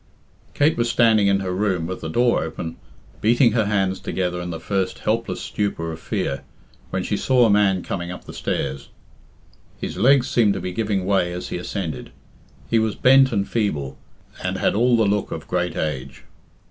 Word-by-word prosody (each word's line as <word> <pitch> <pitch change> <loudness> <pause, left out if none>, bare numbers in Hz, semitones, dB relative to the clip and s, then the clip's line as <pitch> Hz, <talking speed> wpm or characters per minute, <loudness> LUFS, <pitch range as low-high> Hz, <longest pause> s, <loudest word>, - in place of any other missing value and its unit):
Kate 150 +2 +3
was 120 0 +1
standing 110 -3 +4
in 100 0 +2
her 95 -1 -2
room 95 -3 0
with 90 +2 -5
the 80 - -4
door 120 +7 +2
open, 80 +1 -5 0.5
beating 120 +2 +4
her 110 -1 +1
hands 95 -2 0
together 90 -1 -2
in 90 - -5
the 80 -1 -5
first 95 +2 -2
helpless 115 +2 -1
stupor 90 -6 -2
of 80 - -7
fear, 70 -2 -2 0.5
when 95 0 -2
she 105 - -1
saw 125 +4 +3
a 110 - +4
man 100 -3 +3
coming 85 -2 -4
up 90 - -7
the - - -10
stairs. 70 0 -3 0.9
His - - -5
legs 130 +5 +4
seemed 115 -7 +3
to - - -3
be 90 - -4
giving 100 -1 -1
way 95 -3 +1
as 90 +1 -5
he - - -3
ascended; 90 -7 -5 0.6
he 115 - +2
was 110 -1 0
bent 135 +1 +5
and 100 -3 0
feeble, 75 - -1 0.5
and - - -1
had - - +1
all 120 +3 +3
the 110 - +3
look 100 0 0
of 80 - -6
great 90 -1 -1
age. 70 -4 -4
100 Hz, 190 wpm, -22 LUFS, 90-110 Hz, 0.9 s, bent